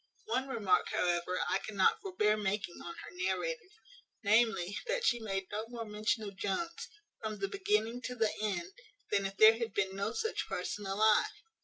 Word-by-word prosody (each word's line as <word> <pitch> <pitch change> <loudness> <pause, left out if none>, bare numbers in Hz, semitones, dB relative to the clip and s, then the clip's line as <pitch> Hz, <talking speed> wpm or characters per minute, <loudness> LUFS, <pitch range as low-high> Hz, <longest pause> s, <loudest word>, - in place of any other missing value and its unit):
One 270 -12 0
remark, 205 -8 +2
however, 175 +1 0
I - - +1
cannot 455 -1 +2
forbear 360 - +2
making 205 -3 -2
on 170 - -7
her - - -9
narrative, 370 - -2 0.5
namely, 205 -3 +3
that - - 0
she 240 - +3
made 195 -3 -2
no 215 +2 -3
more 235 -1 -6
mention 215 +2 -1
of 200 -2 -6
Jones, 335 - -3 0.3
from 215 -1 -3
the 390 - -1
beginning 390 - 0
to 250 - -4
the 225 -3 +1
end, 280 - -2 0.4
than 200 -1 +2
if 195 0 -10
there 220 +1 +8
had 230 -3 -3
been 190 -1 0
no 200 +2 -1
such 445 - -2
person 205 -1 -3
alive. 215 - +4
215 Hz, 175 wpm, -33 LUFS, 195-260 Hz, 0.5 s, there